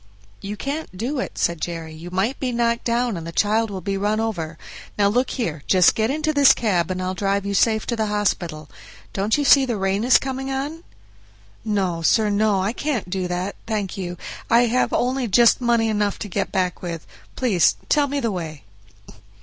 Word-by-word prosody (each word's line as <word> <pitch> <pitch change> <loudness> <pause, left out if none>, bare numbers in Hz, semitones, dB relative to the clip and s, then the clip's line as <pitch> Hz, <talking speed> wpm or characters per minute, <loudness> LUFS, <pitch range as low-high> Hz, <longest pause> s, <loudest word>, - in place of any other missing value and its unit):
"You 205 +1 -5
can't 280 -6 -5
do 255 +7 -2
it," - - -5
said 170 -2 0
Jerry, 165 -2 -5
"you 165 +3 -9
might 195 +9 -1
be 255 -2 -1
knocked 235 -1 0
down 235 -1 0
and 165 -1 -6
the - - -5
child 205 0 0
be 195 +1 -1
run 210 +2 0
over. 170 -8 -3 0.4
Now 200 -1 +4
look 250 +5 +1
here, 165 - -3
just 185 -2 +5
get 220 +1 0
into 310 +2 0
this 285 -2 +6
cab, 185 -7 0
and 185 0 -2
I'll 185 0 -2
drive 200 +1 -1
you 200 - -2
safe 220 +2 +2
to 235 - -1
the 220 -1 -1
hospital. 175 -7 -1 0.5
Don't 200 +5 +1
you 290 - 0
see 275 0 +7
the 240 -4 -1
rain 195 +2 0
is 250 +1 +6
coming 265 0 -4
on?" 285 +5 -4 0.8
"No, 195 -6 -1
sir, 210 +5 +3
no; 205 -1 +2
I 205 +4 -1
can't 250 -11 -3
do 185 -1 -1
that, 180 +3 -3
thank 210 -4 -2
you, 180 -2 -5 0.3
I 235 +1 +6
have 245 +2 +1
only 255 0 0
just 235 +4 +5
money 235 -2 +2
enough 210 -2 0
to - - -6
get 185 - -2
back 180 -2 -1
with. 170 -3 -5 0.3
Please 200 - +3
tell 290 -2 +3
me 280 +1 -2
the 230 -4 -1
way." 160 -5 -6
210 Hz, 200 wpm, -22 LUFS, 185-240 Hz, 0.8 s, see